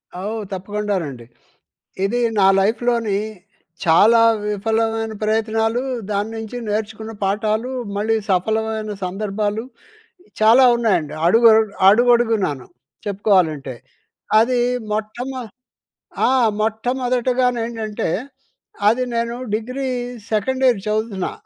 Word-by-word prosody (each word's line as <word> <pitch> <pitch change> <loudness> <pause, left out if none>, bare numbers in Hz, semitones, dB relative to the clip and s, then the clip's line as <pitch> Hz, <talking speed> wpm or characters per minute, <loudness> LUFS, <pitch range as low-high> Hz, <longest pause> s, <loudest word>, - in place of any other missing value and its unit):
ఆ! - - -6
ఓహ్! 225 -1 -4
తప్పకుండానండి. 190 - -3 0.8
ఇది 235 +5 0 0.2
నా 190 - +5
లైఫ్‍లోని 225 0 +1 0.7
చాలా 205 +8 +5 0.3
విఫలమైన 225 +2 -1
ప్రయత్నాలూ, 225 +2 0 0.3
దాని 205 +1 -1
నించి 225 +2 -6
నేర్చుకున్న 220 +1 -3
పాఠాలూ, 215 +4 -1 0.3
మళ్ళీ 220 +2 +1
సఫలమైన 220 +3 -1
సందర్భాలు 205 +3 -2 0.8
చాలా 230 +4 +6
ఉన్నాయండి. 205 -11 0
అడుగ 230 +6 +4 0.4
అడుగడుగునాను, 225 - +2 0.4
చెప్పుకోవాలంటే. 180 - +1 0.6
అది 245 +2 +2 0.3
మొట్టమొ 240 +5 -4 0.9
ఆ! - - +3 0.3
మొట్టమొదటగానేంటంటే, 240 -1 -1 0.8
అది 235 +4 +2
నేను 235 0 -1 0.2
డిగ్రీ 255 +5 -3 0.4
సెకండ్ 260 +5 0
ఇయర్ 240 -6 +3
చదువుతున్నా. 210 -3 -2
220 Hz, 85 wpm, -20 LUFS, 205-235 Hz, 0.9 s, చాలా